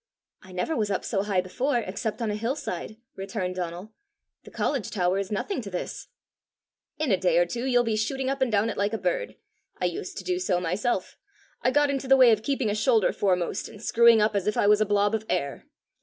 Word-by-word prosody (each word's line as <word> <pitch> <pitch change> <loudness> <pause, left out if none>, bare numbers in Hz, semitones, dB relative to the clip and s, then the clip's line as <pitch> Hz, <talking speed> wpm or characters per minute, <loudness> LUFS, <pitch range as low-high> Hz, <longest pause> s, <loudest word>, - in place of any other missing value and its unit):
"I 185 - -15
never 185 - -2
was 215 -3 0
up 195 - -2
so 195 -4 0
high 200 -2 +1
before, 245 +9 -1
except 220 +2 -3
on 215 - 0
a - - -2
hill 230 +5 -1
side," 215 - -6 0.2
returned 190 -1 -3
Donal. 180 +4 -5 0.5
"The - - -10
college 270 -7 -2
tower 185 -1 0
is 195 0 -4
nothing 255 - -2
to 205 - -7
this!" 180 -2 -5 0.9
"In 305 -5 0
a 190 - +4
day 180 -2 +2
or 175 - +5
two 235 +8 -4
you'll 245 -2 +3
be 225 -2 0
shooting 260 +5 -1
up 270 0 -2
and 260 -3 +2
down 215 +2 +2
it - - -8
like 205 +2 0
a - - 0
bird. - - -2 0.4
I - - 0
used 180 +1 -4
to - - -5
do 365 -1 -1
so 180 - +1
myself. 185 +4 -2 0.4
I - - +3
got 290 +2 +3
into 275 -1 -3
the 270 0 +6
way 255 -3 +7
of 215 -1 +2
keeping 260 -3 0
a - - 0
shoulder 220 0 +2
foremost, 180 -4 0
and 210 - -12
screwing 230 0 +5
up 210 0 +1
as 200 -1 0
if 210 - 0
I - - +3
was 210 +1 +5
a 215 - +2
blob 205 +1 +2
of 220 -1 -1
air! 140 0 -2
215 Hz, 235 wpm, -26 LUFS, 190-245 Hz, 0.9 s, way